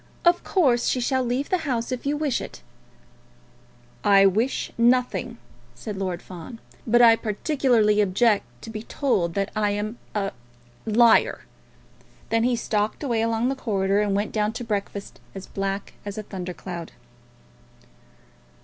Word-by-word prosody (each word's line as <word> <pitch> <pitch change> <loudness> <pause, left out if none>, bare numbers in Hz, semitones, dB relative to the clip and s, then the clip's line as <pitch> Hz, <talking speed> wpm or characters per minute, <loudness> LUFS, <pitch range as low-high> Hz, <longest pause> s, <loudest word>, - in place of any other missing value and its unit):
"Of 345 +1 +4
course, 260 -11 +2
she 255 - +1
shall 260 +1 +1
leave 250 +3 -1
the 370 - +2
house 255 -6 -2
if 255 +2 -4
you 295 +1 0
wish 295 -4 0
it." - - -9 1.4
"I 195 -1 +6
wish 220 +7 +1
nothing," 240 0 +1 0.4
said 205 - -6
Lord 185 -3 -3
Fawn. 185 +5 -10 0.3
"But 240 +2 +5
I 230 -1 +8
peculiarly 225 -2 +2
object 205 - +2 0.2
to 225 - -7
be 215 -1 -5
told 200 - -1
that 200 0 -1
I 210 -1 +1
am 210 +3 -3 0.2
a 195 -1 -1 0.6
liar." 230 +2 +4 0.9
Then 225 0 +2
he 250 0 +2
stalked 215 +1 -1
away 235 -5 0
along 230 +2 +1
the 270 - -1
corridor 200 -5 0
and 205 -2 0
went 205 +2 -1
down 210 0 0
to 240 - -5
breakfast, 205 -2 -4 0.2
as 195 -1 -7
black 195 0 -4
as 205 0 -6
a 215 - -4
thunder 185 -3 -6
cloud. 170 -2 -7
220 Hz, 150 wpm, -24 LUFS, 200-245 Hz, 1.4 s, I